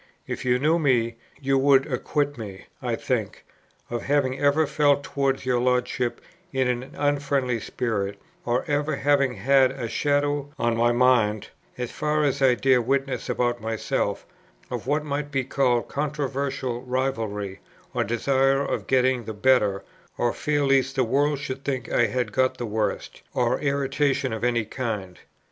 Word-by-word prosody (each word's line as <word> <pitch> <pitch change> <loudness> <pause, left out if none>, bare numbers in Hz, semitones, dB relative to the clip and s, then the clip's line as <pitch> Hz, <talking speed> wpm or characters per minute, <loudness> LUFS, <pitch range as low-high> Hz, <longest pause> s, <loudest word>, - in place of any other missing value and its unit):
If - - -5
you 125 0 +3
knew 155 +6 +2
me, 120 -6 +1 0.2
you 135 -1 +1
would 135 -1 +5
acquit 145 +2 -1
me, 100 -5 -8 0.2
I - - -1
think, - - -3 0.5
of 120 -1 -2
having 135 -2 +1
ever 145 +2 +3
felt 145 -1 +2
towards 135 -2 -1
your 125 -1 +2
Lordship 125 0 0 0.3
in 130 -1 +1
an 125 +3 -3
unfriendly 140 -4 0
spirit, 100 -4 -3 0.2
or 120 +1 0
ever 145 +1 0
having 140 -2 +2
had 135 0 +4
a 130 -3 -5
shadow 145 +3 0
on 120 -1 +1
my 120 +1 +3
mind 120 -4 +2 0.3
(as 125 -1 -4
far 150 0 0
as 140 -1 0
I 130 -2 +5
dare 130 0 +3
witness 135 +2 -1
about 120 -1 0
myself) 110 0 -2 0.5
of - - -4
what 150 +2 +1
might 145 0 -3
be 135 -2 0
called 125 -2 +1
controversial 140 -4 -2
rivalry 115 -7 -2 0.3
or - - +1
desire 135 +4 +2
of - - -3
getting 130 -2 +2
the 110 - -6
better, 105 -4 +3 0.3
or 120 -1 +1
fear 145 -1 0
lest 135 0 +2
the 130 - +3
world 145 +5 +1
should 135 -1 -5
think 130 -3 -3
I 120 - +4
had 120 0 -2
got 130 +4 +1
the 120 - -3
worse, 110 0 -1 0.3
or - - +1
irritation 140 -2 0
of 110 0 -5
any 120 -2 +1
kind. 105 -7 -4
130 Hz, 160 wpm, -25 LUFS, 120-140 Hz, 0.5 s, would